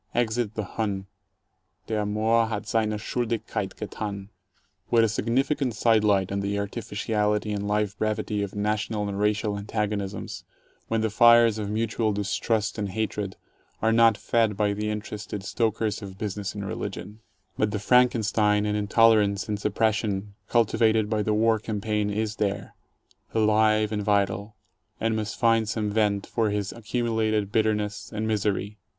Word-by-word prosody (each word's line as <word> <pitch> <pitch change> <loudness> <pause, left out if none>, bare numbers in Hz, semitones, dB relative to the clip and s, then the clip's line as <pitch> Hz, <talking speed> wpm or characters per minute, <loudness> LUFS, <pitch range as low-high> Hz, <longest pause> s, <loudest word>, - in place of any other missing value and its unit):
Exit 115 -2 0
the 110 - -2
Hun 100 -1 -3 0.4
— - - -49
der 105 -2 -1
Moor 110 +2 +2
hat 110 -1 -4
seine 110 -2 0
Schuldigkeit 115 +1 -3
gethan. 100 -2 -5 0.6
What 115 -1 +4
a - - +4
significant 125 +3 0
side 110 0 +3
light 100 -3 +2
on 100 - -1
the 100 +1 -1
artificiality 105 +1 -1
and 100 0 -2
life 105 -1 0
brevity 105 -1 -1
of 100 -1 -4
national 105 0 -1
and 100 0 -4
racial 105 0 0
antagonisms, 105 -1 -3 0.4
when 115 -1 0
the 110 -1 0
fires 115 0 +6
of 105 -1 -3
mutual 110 0 0
distrust 105 +1 -1
and 100 -1 -2
hatred 105 -1 -3 0.4
are 110 - +2
not 115 -2 +5
fed 110 -3 +1
by 105 -1 +2
the 105 +1 -2
interested 105 -1 -5
stokers 110 -1 -1
of 95 -2 -9
business 100 -1 -4
and 100 -1 -4
religion! 105 +2 -6 0.4
But 105 - +1
the 105 - -2
Franken 125 +1 +3
stein 105 -1 +2
and 105 0 0
intolerance 105 -1 +3
and 105 -1 -2
suppression 105 -1 0 0.2
cultivated 110 -2 +2
by 110 -1 +1
the 105 0 0
war 110 0 +3
cam 105 0 -4
paign 105 0 -1
is 110 +1 -2
there, 100 -1 -2 0.6
alive 110 -1 +3
and 105 -1 -1
vital, 100 +1 0 0.4
and 115 0 0
must 105 -1 -3
find 115 -2 +3
some 105 -1 -1
vent 105 -2 +1
for 115 -2 0
his 105 -1 -2
accumulated 110 -3 -1
bitterness 105 -1 0
and 110 0 -2
misery. 105 -1 -1
105 Hz, 155 wpm, -26 LUFS, 105-110 Hz, 0.6 s, fires